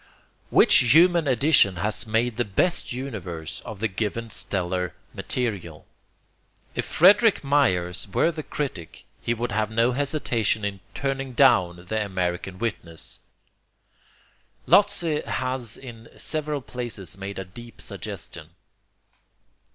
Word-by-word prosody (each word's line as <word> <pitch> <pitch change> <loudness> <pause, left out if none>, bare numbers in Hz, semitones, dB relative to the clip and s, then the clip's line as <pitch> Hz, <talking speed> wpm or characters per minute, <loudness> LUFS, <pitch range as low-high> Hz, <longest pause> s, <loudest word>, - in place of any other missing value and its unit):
Which - - +5 0.2
human 170 -1 +5
addition 130 - +5
has 105 +6 0
made 115 +1 0
the 120 - +2
best 120 - 0
universe 95 - -6
of 110 -3 -8
the 115 - +1
given 110 +3 -3
stellar 90 -3 -1 0.2
material? 100 -11 -4 0.9
If - - -2
Frederick 200 +4 +5
Myers 95 -13 +1
were 165 - +2
the 155 -1 -5
critic, 130 - -6 0.2
he 120 - -1
would 120 +1 -3
have 110 0 0
no 115 +2 +2
hesitation 125 -6 0
in 100 -1 -3 0.2
'turning 135 -1 -3
down' 95 -10 +3
the 110 +3 -1
American 95 -1 -3
witness. 90 -7 -4 1.5
Lotze 175 -7 +3
has 130 -3 -3
in 115 -3 -11
several 150 -2 -2
places 120 -8 -6
made 100 +1 -7
a 95 - -5
deep 120 +6 -13
suggestion. - - -8
115 Hz, 120 wpm, -25 LUFS, 95-135 Hz, 1.5 s, Which